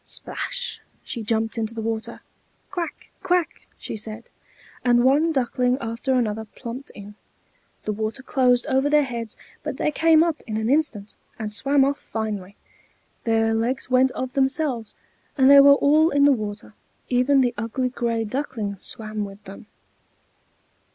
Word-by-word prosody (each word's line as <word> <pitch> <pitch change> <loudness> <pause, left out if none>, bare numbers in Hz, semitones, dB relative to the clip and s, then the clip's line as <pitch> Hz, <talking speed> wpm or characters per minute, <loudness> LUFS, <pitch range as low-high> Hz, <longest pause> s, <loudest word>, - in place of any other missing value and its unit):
Splash! 485 0 -3 0.2
she 235 - -5
jumped 225 +1 -1
into 225 +1 -3
the 225 - -4
water. 225 0 -4 0.5
"Quack! 345 -4 -5
quack!" 360 -3 -1
she - - -6
said, 220 +1 -5 0.6
and 240 -1 +4
one 290 +6 +4
duckling 250 -2 +1
after 230 +3 -2
another 220 -3 0
plumped 250 +3 -7
in. 205 0 -10 0.7
The 215 - -2
water 220 +5 -4
closed 250 -2 +2
over 270 0 +1
their 300 0 +4
heads, 235 -4 -6 0.2
but - - -5
they - - 0
came 320 +1 +5
up 330 -3 -1
in 215 -1 -3
an 220 +3 0
instant, 245 -9 0 0.2
and 215 -1 -4
swam 275 +4 +3
off 280 +1 -1
finely; 205 -3 -5 0.7
their 225 -1 +2
legs 245 +3 -2
went 255 +1 +5
of 255 -1 -4
themselves, 270 -4 -1 0.4
and 265 0 +6
they 280 - +10
were 280 0 +8
all 305 +3 +4
in 285 -2 +2
the 285 - +6
water; 210 -4 -4 0.4
even 260 +2 +3
the 245 -1 +1
ugly 230 +4 -2
gray 230 -2 -1
Duckling 220 -4 -3
swam 215 0 -2
with 200 0 -9
them. 200 +1 -11
245 Hz, 155 wpm, -23 LUFS, 220-280 Hz, 0.7 s, they